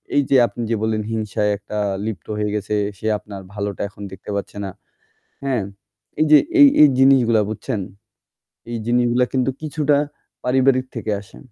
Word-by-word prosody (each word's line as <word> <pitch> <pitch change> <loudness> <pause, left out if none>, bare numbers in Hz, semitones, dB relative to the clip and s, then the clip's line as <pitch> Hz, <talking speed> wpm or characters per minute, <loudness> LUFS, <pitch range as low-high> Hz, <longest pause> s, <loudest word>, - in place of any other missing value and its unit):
এইযে 140 -1 +2
আপনি 120 - -8
যে 115 - +1
বললেন, 110 -1 0
হিংসায় 105 -1 -1
একটা 105 +1 -7 0.3
লিপ্ত 110 -3 -5
হয়ে 105 0 -1
গেছে, 105 +1 -2 0.2
সে 110 - -4
আপনার 100 -2 -9
ভালোটা 100 -1 -4
এখন 105 - -15
দেখতে 95 +2 -11
পাচ্ছে 100 0 -5
না, - - -4 0.8
হ্যাঁ? 130 -6 0 0.6
এইযে 155 -1 +7 0.2
এই 285 - +10
এই 150 - +9
জিনিসগুলা 130 -5 +5
বুঝছেন 110 0 -3 0.9
এই 115 - -2
জিনিসগুলা 120 +1 +2
কিন্তু 130 0 +1
কিছুটা 150 -2 +1 0.5
পারিবারিক 130 0 +3
থেকে 110 -2 -3
আসে 100 - -16
115 Hz, 150 wpm, -21 LUFS, 105-135 Hz, 0.9 s, এই